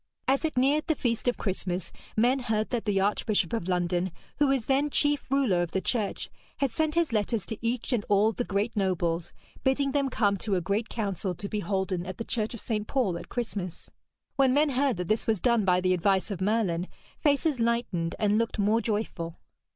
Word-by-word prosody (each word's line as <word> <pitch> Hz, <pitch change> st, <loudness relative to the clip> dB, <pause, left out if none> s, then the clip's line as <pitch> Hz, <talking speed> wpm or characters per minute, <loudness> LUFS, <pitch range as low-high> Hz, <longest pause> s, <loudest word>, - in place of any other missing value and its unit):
As 270 Hz, +3 st, +2 dB
it 315 Hz, -5 st, -1 dB
neared 285 Hz, +5 st, +3 dB
the 315 Hz, -, +2 dB
feast 235 Hz, -3 st, -1 dB
of 245 Hz, -, +2 dB
Christmas, 185 Hz, -3 st, -2 dB, 0.3 s
men 245 Hz, +5 st, +4 dB
heard 220 Hz, -3 st, -1 dB
that 240 Hz, -3 st, -1 dB
the 200 Hz, -2 st, +2 dB
Archbishop 205 Hz, -1 st, +1 dB
of 225 Hz, -6 st, -2 dB
London, 180 Hz, 0 st, 0 dB, 0.3 s
who 295 Hz, -, +5 dB
was 270 Hz, -4 st, +1 dB
then 280 Hz, +2 st, +2 dB
chief 290 Hz, 0 st, +2 dB
ruler 260 Hz, -10 st, +2 dB
of 175 Hz, -, -3 dB
the 190 Hz, -, +2 dB
Church, 215 Hz, +1 st, -1 dB, 0.3 s
had 275 Hz, -3 st, 0 dB
sent 315 Hz, +4 st, 0 dB
his 335 Hz, -7 st, +1 dB
letters 210 Hz, -1 st, 0 dB
to 220 Hz, -, -5 dB
each 235 Hz, +2 st, -1 dB
and 225 Hz, -4 st, +1 dB
all 205 Hz, +2 st, +4 dB
the 245 Hz, -, -2 dB
great 205 Hz, +2 st, -1 dB
nobles, 175 Hz, -4 st, 0 dB, 0.3 s
bidding 275 Hz, +1 st, +2 dB
them 280 Hz, -1 st, +1 dB
come 205 Hz, -5 st, +2 dB
to 200 Hz, +1 st, -1 dB
a -, -, +2 dB
great 200 Hz, +5 st, -1 dB
council 195 Hz, -4 st, -2 dB
to 200 Hz, +4 st, -5 dB
be 210 Hz, -, -2 dB
holden 190 Hz, -3 st, -1 dB
at 185 Hz, -, -6 dB
the 230 Hz, -, -4 dB
church 220 Hz, 0 st, -2 dB
of -, -, -7 dB
St. 215 Hz, -1 st, -2 dB
Paul 240 Hz, -10 st, +1 dB
at 170 Hz, -, -8 dB
Christmas. 200 Hz, -7 st, -4 dB, 0.5 s
When 265 Hz, -1 st, +4 dB
men 295 Hz, +1 st, +4 dB
heard 270 Hz, -3 st, +1 dB
that 180 Hz, -1 st, -3 dB
this 215 Hz, +1 st, 0 dB
was 220 Hz, -3 st, +2 dB
done 235 Hz, 0 st, +2 dB
by 180 Hz, -1 st, +4 dB
the 185 Hz, 0 st, +2 dB
advice 190 Hz, +3 st, +1 dB
of 190 Hz, -2 st, -4 dB
Merlin, 190 Hz, -4 st, +1 dB, 0.3 s
faces 290 Hz, -2 st, +2 dB
lightened 230 Hz, -8 st, 0 dB
and 210 Hz, 0 st, +2 dB
looked 230 Hz, 0 st, -1 dB
more 215 Hz, +3 st, +3 dB
joyful. 205 Hz, -7 st, -3 dB
215 Hz, 210 wpm, -28 LUFS, 190-250 Hz, 0.5 s, who